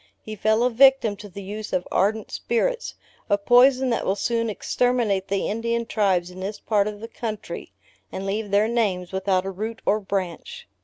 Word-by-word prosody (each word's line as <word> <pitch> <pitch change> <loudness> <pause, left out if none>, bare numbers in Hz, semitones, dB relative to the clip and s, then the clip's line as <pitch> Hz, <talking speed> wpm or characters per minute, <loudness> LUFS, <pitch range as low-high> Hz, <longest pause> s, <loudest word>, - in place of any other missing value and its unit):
He 215 - -7
fell 220 +2 +2
a 250 - +2
victim 260 -3 +5
to 205 0 -10
the 200 +2 -9
use 210 +2 -6
of 180 - -1
ardent 210 +3 +1
spirits 475 - -1 0.3
a 205 - +4
poison 250 +4 +4
that 230 - 0
will 190 - 0
soon 230 +2 0
exterminate 220 -3 0
the 195 0 -1
Indian 230 +2 -1
tribes 190 -6 +1
in 180 - -11
this 200 +2 -5
part 205 -2 +1
of 210 0 -6
the 225 - -6
country, 220 -2 -6 0.4
and 190 - -5
leave 205 +2 -2
their 205 +2 +3
names 200 -7 0
without 190 -1 0
a 195 - -3
root 220 +4 -5
or 210 - +3
branch. 200 - -4
215 Hz, 190 wpm, -24 LUFS, 195-235 Hz, 0.4 s, victim